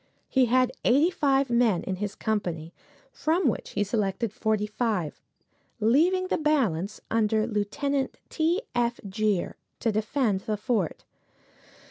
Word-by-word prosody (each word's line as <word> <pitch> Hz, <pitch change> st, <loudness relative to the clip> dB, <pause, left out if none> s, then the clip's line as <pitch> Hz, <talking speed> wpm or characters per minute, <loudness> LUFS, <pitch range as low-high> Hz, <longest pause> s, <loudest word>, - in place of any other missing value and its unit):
He 260 Hz, -2 st, +3 dB
had 255 Hz, +1 st, +3 dB
eighty 290 Hz, +8 st, +4 dB
five 275 Hz, -5 st, +2 dB
men 235 Hz, -7 st, +3 dB
in 190 Hz, -, -3 dB
his 205 Hz, +1 st, -4 dB
company, 175 Hz, -7 st, -2 dB, 0.4 s
from 330 Hz, +4 st, +1 dB
which -, -, -2 dB
he 205 Hz, -, +1 dB
selected 205 Hz, +1 st, -1 dB
forty 215 Hz, -1 st, 0 dB
five, 210 Hz, -7 st, -2 dB, 0.6 s
leaving 325 Hz, -, +3 dB
the -, -, -1 dB
balance, 225 Hz, -, 0 dB
under 220 Hz, -1 st, +2 dB
Lieut. 210 Hz, -3 st, -2 dB, 0.5 s
T. 340 Hz, +6 st, +1 dB
F. 240 Hz, 0 st, 0 dB
Gere, 205 Hz, -1 st, 0 dB, 0.3 s
to 225 Hz, -, +1 dB
defend 215 Hz, -1 st, 0 dB
the 210 Hz, +2 st, -3 dB
fort. 210 Hz, -, -1 dB
220 Hz, 130 wpm, -27 LUFS, 205-260 Hz, 0.6 s, eighty